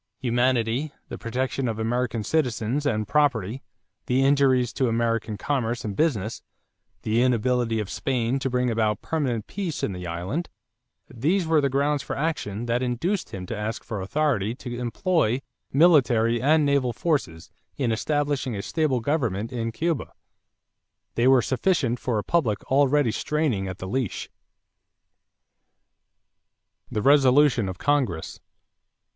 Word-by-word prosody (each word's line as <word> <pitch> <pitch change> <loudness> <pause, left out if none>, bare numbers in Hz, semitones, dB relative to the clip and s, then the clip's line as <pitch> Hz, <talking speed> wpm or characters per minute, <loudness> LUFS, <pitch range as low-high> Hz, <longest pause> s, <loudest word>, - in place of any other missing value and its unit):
Humanity, 125 +2 +1 0.2
the - - -6
protection 130 +2 -2
of 115 -2 -2
American 115 0 -1
citizens 130 0 0
and 110 -5 0
property, 130 -4 +1 0.5
the 130 0 +2
injuries 130 -3 +3
to 130 - +1
American 115 -2 -1
commerce 120 -1 -2
and 100 -2 -3
business, 115 - 0 0.6
the 110 +2 +1
inability 125 -2 +1
of 105 - -3
Spain 125 +3 -1
to 135 - -1
bring 125 -1 +1
about 110 -2 0
permanent 130 -9 -1
peace 185 -7 -4
in 100 - -1
the 90 -1 -6
island 95 - -3 0.6
these 165 - 0
were 160 -1 +3
the 140 - +1
grounds 140 +2 +1
for - - -5
action 135 -8 -2
that 120 +1 0
induced 130 - -1
him 95 -1 -6
to 115 - -5
ask 110 +2 -4
for 105 -4 -5
authority 115 -1 0
to 125 -2 -7
employ 125 - 0 0.3
military 125 -7 +4
and 150 +3 +4
naval 140 -4 +1
forces 110 - -2 0.3
in 125 -5 0
establishing 145 0 -1
a 100 - -4
stable 150 -7 0
government 115 -6 -1
in 115 -1 -2
Cuba. 165 +5 -2 1.0
They 120 +2 +2
were 130 -2 +5
sufficient 130 -4 +1
for 120 -4 -1
a 105 - -1
public 120 -12 0
already 140 -2 +3
straining 140 -9 -1
at 95 -1 -5
the 95 - -6
leash. 125 +1 -3 2.6
=The 105 - -2
Resolution 135 -5 +5
of 95 - -6
Congress. 130 - -1
125 Hz, 140 wpm, -25 LUFS, 110-145 Hz, 2.6 s, were